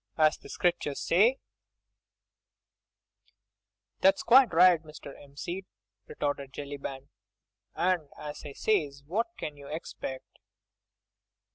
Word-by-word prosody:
As 155 -1 +4
the - - -15
Scriptures 170 -5 0
say—" 220 +10 +4 2.6
"That's 195 +1 +4
quite 255 +1 +7
right, 175 0 +6
Mr. 150 -3 -11
'Empseed," 170 +7 -7 0.4
retorted 140 -2 -3
Jellyband, 140 -1 -7 0.7
"and 175 -5 +1
as 150 0 -7
I 145 - -8
says, 145 -8 0
what 205 +10 0
can 150 -1 -6
you 140 -1 -12
'xpect? 140 -4 -7
155 Hz, 100 wpm, -29 LUFS, 140-185 Hz, 2.6 s, quite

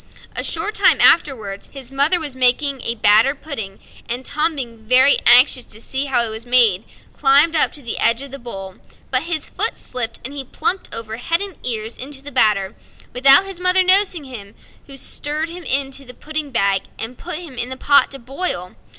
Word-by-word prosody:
A - - -2
short 425 - -2
time - - +3
afterwards 220 -11 +1
his 270 -2 -8
mother 285 +6 +2
was 295 -5 -5
making 260 +2 +1
a 235 - -2
batter 220 +5 +3
pudding, 225 -10 -8 0.3
and 245 +2 -4
Tom, 310 +2 0
being 255 +1 +2
anxious 250 +1 +5
to 215 - -9
see 265 +4 -1
how 260 -4 +1
it - - -4
was 220 +1 -6
made, 235 -5 +3 0.3
climbed 290 +4 +3
up 310 - +3
to 290 - -10
the 235 - -4
edge 230 +3 +4
of 280 - -9
the 275 - -9
bowl; 195 -6 -9 0.3
but 255 -1 +2
his 335 -2 -3
foot 440 +4 +1
slipped, 235 -2 -4
and 270 - -7
he 280 -1 -6
plumped 360 +8 -2
over 225 -1 -7
head 330 +7 -1
and 400 -3 -4
ears 225 -2 -3
into 275 +1 -8
the 290 - -8
batter, 210 -6 0 0.4
without 275 +8 +7
his 390 -2 -9
mother 365 +1 +5
noticing 370 -3 +4
him, 225 -7 -11 0.3
who 275 -1 -11
stirred 300 +4 -3
him 350 +1 -10
into 275 -1 -2
the 250 -1 -13
pudding 310 -1 -5
bag, 200 -6 0 0.2
and 235 +2 -7
put 355 0 -7
him 335 -5 -10
in 245 0 -4
the 260 - -7
pot 285 +2 +3
to 275 - -7
boil. 250 - -4
265 Hz, 200 wpm, -18 LUFS, 235-300 Hz, 0.4 s, without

